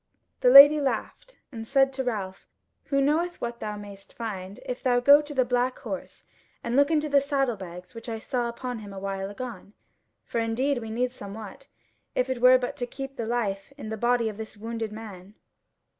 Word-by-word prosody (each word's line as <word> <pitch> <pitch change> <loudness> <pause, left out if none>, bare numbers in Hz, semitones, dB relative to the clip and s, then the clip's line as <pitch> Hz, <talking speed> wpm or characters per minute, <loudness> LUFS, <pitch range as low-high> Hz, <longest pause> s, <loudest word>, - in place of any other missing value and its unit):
The 250 - +4
Lady 285 +3 +10
laughed, 285 - -3
and 225 -3 -7
said 270 0 +3
to 265 0 -2
Ralph; 200 -6 -4 0.4
"Who 275 -1 +1
knoweth 325 +5 +1
what 235 0 -4
thou 210 -1 -4
mayst 200 -1 -12
find 200 -4 -6
if 250 - -5
thou 245 -1 +2
go 285 +4 +7
to 295 0 -8
the 260 -1 +3
black 250 +1 0
horse - - -7 0.4
and 235 +1 -2
look 285 +1 +4
into 310 -2 +1
the 280 -1 +4
saddle 275 -4 0
bags 180 -2 -10
which 230 0 -8
I 225 - -3
saw 240 +1 -2
upon 245 0 -5
him 205 -2 -10
awhile 195 0 -4
agone? 235 -1 -8 0.5
For 235 - -2
indeed 245 +4 0
we 225 -1 -7
need 245 +3 -1
somewhat, 215 +3 -9 0.5
if 255 +1 0
it 250 -2 -3
were 255 +1 +8
but 250 -1 -4
to 245 - -3
keep 270 +1 -7
the 230 -3 -4
life 205 -3 -2
in 215 -7 -7
the 220 - -3
body 240 +1 +1
of 215 -2 -5
this 220 -1 -8
wounded 225 0 -4
man." 205 -3 -10
240 Hz, 200 wpm, -26 LUFS, 215-270 Hz, 0.5 s, Lady